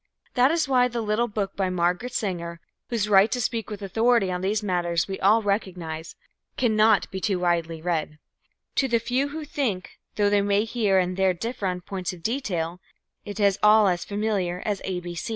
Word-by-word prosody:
That 250 +1 +4
is 325 -2 +1
why 250 -2 +4
the 240 -1 -4
little 220 +2 0
book 205 -3 -3
by 190 -2 0
Margaret 180 +7 0
Sanger, 170 -6 -3 0.3
whose 225 -3 0
right 205 +1 +5
to 250 - 0
speak 225 -2 -2
with 210 -1 -7
authority 225 0 +2
on 180 0 -3
these 205 +3 0
matters 175 -4 0
we 190 -1 -5
all 215 +4 +4
recognize, 180 -6 -3 0.4
cannot 220 -4 +3
be 190 -1 -5
too 195 -2 +1
widely 170 -2 -1
read. 160 -3 -2 0.6
To 270 - +3
the 235 -2 +2
few 250 +4 0
who 305 +2 -6
think, 240 -11 -3 0.2
though 205 -1 +2
they 205 -1 +4
may 200 +1 +2
here 215 -4 +1
and 180 0 0
there 190 -1 +2
differ 225 +1 -3
on 180 -1 -2
points 185 -1 -4
of 170 -2 -13
detail, 180 -8 -2 0.4
it 205 +1 -7
is 200 -2 +3
all 210 0 +6
as 175 -2 0
familiar 200 -4 -2
as 205 -2 -1
A. 180 -2 -3
200 Hz, 190 wpm, -25 LUFS, 180-225 Hz, 0.6 s, all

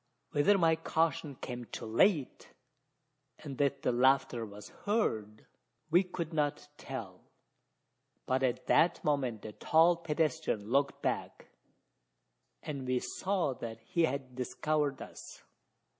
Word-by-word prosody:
Whether 195 +8 +4
my 165 -3 +4
caution 160 -3 0
came 125 -1 -6
too - - -7
late, 140 - +1 0.8
and 140 -4 -8
that 140 -2 +1
the - - +2
laughter 125 -2 +2
was 105 0 -11 0.2
heard, 110 - -1 0.5
we 175 +3 +6
could 175 -3 -5
not 145 -1 -1
tell; 110 -9 -7 1.0
but 130 +1 +1
at 125 -2 0
that 170 +1 +3
moment 130 -7 0
the 110 - -6
tall 165 +9 +4
pedestrian 155 -9 -1
looked 140 +1 +1
back, - - -3 1.1
and 140 -4 -5
we 125 0 +2
saw 185 +1 -1
that 115 -2 -7
he 165 +8 +1
had 135 -3 -4
discovered 140 +3 -1
us. - - -11
140 Hz, 125 wpm, -32 LUFS, 125-160 Hz, 1.1 s, we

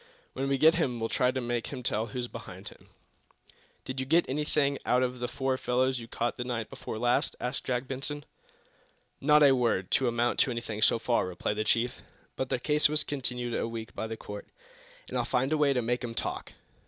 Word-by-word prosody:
When 135 +1 -2
we 135 - +2
get 160 +4 +7
him 125 -6 0
we'll 115 0 -1
try 125 -1 +2
to 130 +1 -1
make 120 -1 -2
him 125 - -6
tell 110 0 0
who's 120 +2 -4
behind - - -9
him." - - -18 1.0
"Did 130 0 -4
you 130 - -1
get 165 +4 +4
anything 140 0 +1
out 125 +1 +3
of 125 0 -2
the 120 - -1
four 130 0 -1
fellows 130 +1 +1
you 115 - -8
caught 120 +1 -2
night 120 -3 -3
before - - -6
last?" 120 +2 +2
asked 125 - -3
Jack 125 0 0
Benson. 140 +2 -4 1.0
"Not 150 +1 +6
a 140 - +8
word 120 -8 +1
to 130 - +3
amount 120 0 +1
to - - +4
anything, 115 -3 -4
so 110 - +5
far," 115 -3 +1
replied 90 +3 -2
the 110 - +1
chief. 120 +3 +1 0.3
"But 130 - -2
their - - +1
case 150 +4 +3
was 155 0 +1
continued 125 -4 -3
a - - 0
week 115 -1 -6
by 110 - -3
the 110 0 -5
court, 105 -1 -8 0.6
and - - -7
I'll - - +2
find 130 +4 +1
a - - +3
way 145 -2 +4
to 125 -3 +1
make 120 +2 0
'em 115 -1 -4
talk! - - -4
125 Hz, 215 wpm, -29 LUFS, 115-135 Hz, 1.0 s, a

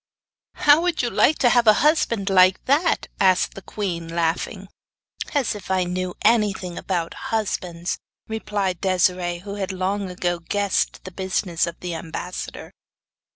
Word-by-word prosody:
'How 295 +2 +5
would 350 -5 0
you 240 - -1
like 305 - +4
to 245 - +4
have 240 -1 +3
a 215 - +9
husband 230 -10 +2
like 185 0 +5
that?' 295 +6 +2
asked 185 -2 +3
the 195 - -9
queen, 175 -4 -4
laughing. 170 +4 -2 0.7
'As 275 -5 +1
if 205 -2 -10
I 190 -1 +2
knew 180 0 -3
anything 205 -5 +2
about 175 -3 -2 0.2
husbands!' 180 -5 -2 0.3
replied 205 -5 -2
Desiree, 180 -2 +1
who 200 - -5
had 190 0 -2
long 190 +1 -2
ago 175 -1 -2
guessed 200 +3 -1
the 185 - -8
business 185 -2 -1
of 170 - -7
the 180 -1 -4
ambassador. 165 +2 -6
190 Hz, 150 wpm, -23 LUFS, 180-210 Hz, 0.7 s, a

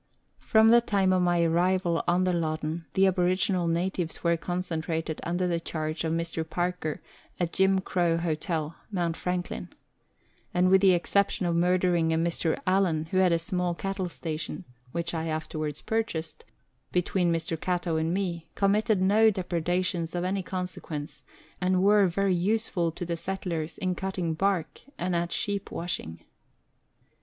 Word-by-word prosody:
From 220 0 +4
the 235 +1 +7
time 195 -4 +2
of 185 - +3
my 175 -1 +3
arrival 175 +1 +2
on 175 +1 +3
the 185 -1 +1
Loddon 160 0 -2
the 195 - +5
aboriginal 185 -1 +2
natives 170 0 -1
were 170 -1 +3
concentrated 165 -2 -3
under 175 +2 -1
the 170 -1 0
charge 155 -1 -3
of 160 - -1
Mr. 165 0 -1
Parker 175 -1 -3 0.4
at 175 -2 -1
Jim 190 0 +3
Crow 175 -3 +1
Hill 160 -1 -2 0.2
(Mount 175 -5 -1
Franklin), 180 0 -3 0.9
and 180 +1 +4
with 190 0 +6
the 190 -2 +6
exception 190 +2 +1
of 170 -1 +1
murdering 175 -1 +2
a 160 - +2
Mr. 165 0 +1
Allan, 180 -4 +1
who 185 - +1
had 185 -1 +4
a 170 - +4
small 175 +1 -1
cattle 195 0 -3
station 160 +2 -5 0.3
(which 170 +2 -2
I 165 0 -2
afterwards 155 -1 -4
purchased) 225 - -3 0.5
between 180 0 +1
Mr. 165 0 -1
Catto 175 -1 -1
and 160 +1 0
me, 175 -3 -2
committed 205 0 +2
no 215 +3 +5
depredations 180 -2 -1
of 175 - -1
any 190 +2 0
consequence, 180 -5 -5 0.4
and 185 0 +2
were 205 -1 +5
very 195 +2 +1
useful 180 -2 0
to 175 - -5
the 170 0 -2
settlers 170 -3 -3
in 185 -1 -1
cutting 180 -2 -2
bark 190 0 -1 0.2
and 180 0 -1
at 170 0 -1
sheep 200 -1 -1
washing. 125 - -4
175 Hz, 155 wpm, -27 LUFS, 165-185 Hz, 0.9 s, the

